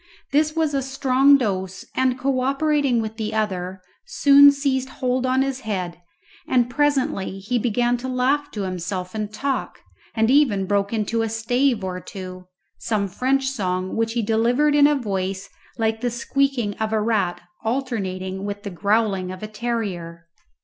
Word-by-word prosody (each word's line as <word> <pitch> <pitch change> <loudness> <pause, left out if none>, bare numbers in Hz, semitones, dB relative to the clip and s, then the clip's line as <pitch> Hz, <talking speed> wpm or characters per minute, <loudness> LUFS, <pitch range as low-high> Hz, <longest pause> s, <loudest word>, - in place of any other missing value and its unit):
This 305 +2 +2
was 320 -2 +1
a 275 - +1
strong 270 +1 +4
dose, 190 -6 -3
and 260 -1 +2
co 265 0 0
operating 275 -2 +1
with 220 0 -6
the 220 -1 -3
other, 190 -3 -2 0.2
soon 285 -7 +7
seized 270 -2 -1
hold 255 -1 -1
on 260 +1 +2
his 270 -1 -3
head, 185 -7 -4 0.5
and 245 -1 +2
presently 270 -9 0
he 210 +6 -1
began 240 +2 +1
to 250 +2 -6
laugh 260 +3 +1
to 205 - -3
himself 185 0 -4
and 215 -1 -3
talk, 270 +5 -3 0.4
and 225 +1 +3
even 250 -9 +3
broke 200 +1 0
into 225 0 0
a 225 - -1
stave 235 +1 +1
or 185 -1 -3
two 185 -1 -9 0.3
some 210 -3 -1
French 265 +8 0
song 185 -6 -2
which 225 0 0
he 235 -1 0
delivered 240 +7 +2
in 290 0 +6
a 295 - +2
voice 195 -5 -3 0.3
like 225 -1 0
the 245 - 0
squeaking 240 -2 0
of 220 0 -2
a 220 - +2
rat 210 -5 0 0.2
alternating 195 -6 -3
with 205 0 -5
the 200 - -5
growling 200 -1 0
of 185 +2 -8
a - - -3
terrier. 200 -7 -4
225 Hz, 165 wpm, -22 LUFS, 195-265 Hz, 0.5 s, soon